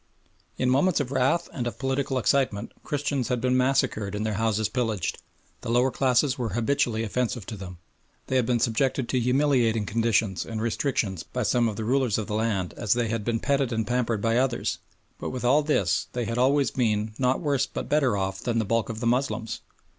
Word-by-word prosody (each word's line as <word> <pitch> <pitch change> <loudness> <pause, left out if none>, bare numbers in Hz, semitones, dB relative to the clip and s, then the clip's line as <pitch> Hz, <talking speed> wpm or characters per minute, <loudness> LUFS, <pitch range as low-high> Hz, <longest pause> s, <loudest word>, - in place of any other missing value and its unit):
In 130 - 0
moments 145 +8 +3
of 135 -3 -2
wrath 140 +6 +1
and 120 -3 -3
of 115 -2 -5
political 135 0 -1
excitement 130 -5 +1
Christians 140 -3 -1
had 125 -1 0
been 125 +1 +1
massacred 125 -6 +1
and 105 +1 -2
their 110 - -1
houses 110 -1 +1
pillaged, 110 -5 -2 0.4
the - - -6
lower 125 +3 +3
classes 130 +1 +2
were 120 -3 -2
habitually 120 -2 +1
offensive 120 -1 -2
to 115 - -6
them, 90 -3 -8 0.5
they 130 - -2
had 125 -3 +2
been 120 -1 +2
subjected 125 +3 +1
to 130 - +1
humiliating 125 -4 +2
conditions 110 -4 +1
and 110 -1 -5
restrictions 110 - -1
by 125 +7 -4
some 120 +1 +2
of 105 - -5
the 110 - -4
rulers 125 -2 +2
of 110 - -2
the 105 - -5
land 105 -5 -1
as 105 - +2
they 120 -2 0
had 115 -1 -2
been 115 +1 0
petted 135 -1 +1
and 110 -1 -1
pampered 120 -2 -1
by 115 0 +2
others, 130 -2 0 0.4
but - - -4
with 125 -1 -4
all 140 +5 +5
this 125 - +1
they 120 -1 -2
had 115 +2 -2
always 135 +1 +3
been 110 -3 0
not 130 0 +2
worse 140 -4 0
but - - -5
better 135 -8 +2
off 95 0 -2
than 120 -2 -1
the 110 - +1
bulk 115 +2 0
of 115 0 -5
the - - -2
Moslems. 120 -2 -1
120 Hz, 205 wpm, -26 LUFS, 110-130 Hz, 0.5 s, all